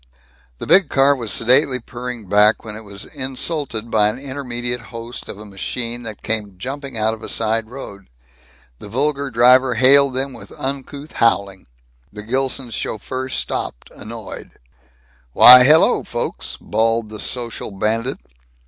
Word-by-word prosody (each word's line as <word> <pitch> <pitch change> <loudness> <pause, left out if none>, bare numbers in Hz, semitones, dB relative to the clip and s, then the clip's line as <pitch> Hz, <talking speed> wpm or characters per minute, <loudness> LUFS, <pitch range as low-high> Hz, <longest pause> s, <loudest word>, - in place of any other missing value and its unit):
The - - -7
big 190 -5 +5
car 140 +1 +3
was 115 -5 -4
sedately 125 +2 +3
purring 120 -2 -7
back 105 +4 +3
when 105 -1 -7
it 110 - -9
was 100 -2 -9
insulted 130 -4 -3
by 105 -1 +3
an 110 +3 -2
intermediate 125 -3 -3
host 115 +1 -8
of - - -7
a 105 - -11
machine 115 +5 -4
that 110 -3 -8
came 105 -4 -2
jumping 135 +3 -6
out 110 0 +1
of 110 - -10
a - - -7
side 110 0 -1
road. 100 -7 -10 0.7
The 105 - -11
vulgar 140 +4 -1
driver 125 +1 +4
hailed 135 +2 +5
them 135 +1 -2
with - - -12
uncouth 140 +2 -5
howling. 100 -4 0 0.4
The 105 0 -9
Gilsons' 130 +1 -2
chauffeur 130 +5 -4
stopped, - - -4
annoyed. 110 -1 -9 0.8
"Why, 125 - +10
hello 155 +5 +5
folks," - - -4
bawled 115 0 0
the 110 0 -9
social 120 0 -4
bandit. 110 +6 -2
120 Hz, 150 wpm, -19 LUFS, 110-130 Hz, 0.8 s, Why